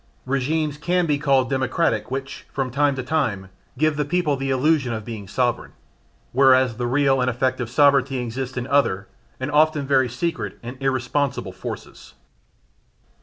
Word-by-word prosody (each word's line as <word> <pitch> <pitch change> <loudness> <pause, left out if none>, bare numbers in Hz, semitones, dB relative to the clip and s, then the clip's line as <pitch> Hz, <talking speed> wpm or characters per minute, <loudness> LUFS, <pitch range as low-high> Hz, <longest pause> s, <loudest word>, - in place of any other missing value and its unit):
Regimes 145 +3 -1
can 175 +3 +1
be 145 -3 +1
called 135 -3 +2
democratic 135 +3 0
which, 135 +1 -6
from 130 -2 -2
time 140 +1 +2
to 130 - -4
time, 110 -10 -1 0.3
give 155 +1 +1
the 150 - +1
people 155 -1 0
the 135 0 -3
illusion 135 -1 +2
of 110 -2 -5
being 110 -4 -7
sovereign, 120 +3 -1 0.6
whereas 130 -2 +4
the 120 0 -1
real 135 0 +2
and 125 - +2
effective 125 -1 -1
sovereignty 140 0 +3
exists 125 +2 -4
in 125 - -2
other, 125 -9 +1 0.3
and 130 +3 -3
very 145 -3 +3
often - - -8
secret 120 - -3
and 120 +2 -6
irresponsible 135 +1 -1
forces. - - -9
135 Hz, 155 wpm, -22 LUFS, 125-145 Hz, 0.6 s, whereas